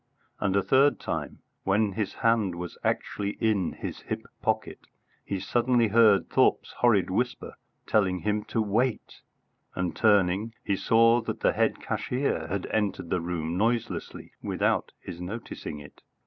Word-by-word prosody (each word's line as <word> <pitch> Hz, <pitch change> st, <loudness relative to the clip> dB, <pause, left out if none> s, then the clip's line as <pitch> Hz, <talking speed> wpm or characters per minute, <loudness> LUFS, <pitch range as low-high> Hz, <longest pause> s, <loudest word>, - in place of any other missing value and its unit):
And 100 Hz, -1 st, 0 dB
a 100 Hz, -, +3 dB
third 135 Hz, -1 st, +4 dB
time, -, -, -5 dB, 0.2 s
when 100 Hz, +2 st, +2 dB
his 105 Hz, +1 st, -3 dB
hand 115 Hz, -6 st, +2 dB
was 90 Hz, 0 st, -6 dB
actually 100 Hz, 0 st, -2 dB
in 105 Hz, -6 st, +1 dB
his -, -, -6 dB
hip -, -, -5 dB, 0.2 s
pocket, -, -, -1 dB, 0.4 s
he 100 Hz, -, -3 dB
suddenly 120 Hz, +3 st, +2 dB
heard 110 Hz, -2 st, +5 dB
Thorpe's -, -, +2 dB
horrid -, -, +3 dB
whisper -, -, -2 dB, 0.3 s
telling 95 Hz, -4 st, +1 dB
him 105 Hz, 0 st, 0 dB
to 115 Hz, -, 0 dB
wait, 115 Hz, +4 st, -1 dB, 0.5 s
and 90 Hz, -1 st, -2 dB
turning, 105 Hz, +1 st, +2 dB
he 100 Hz, -, 0 dB
saw 115 Hz, +4 st, +4 dB
that 115 Hz, -, -5 dB
the -, -, +3 dB
head -, -, +1 dB
cashier 125 Hz, -, -2 dB
had 100 Hz, +1 st, -3 dB
entered 105 Hz, -5 st, -1 dB
the 90 Hz, -, +1 dB
room 85 Hz, -1 st, -3 dB
noiselessly 115 Hz, +2 st, -2 dB
without -, -, 0 dB
his 85 Hz, -, -9 dB
noticing 90 Hz, -5 st, -6 dB
it. 70 Hz, -, -14 dB
105 Hz, 150 wpm, -27 LUFS, 90-115 Hz, 0.5 s, heard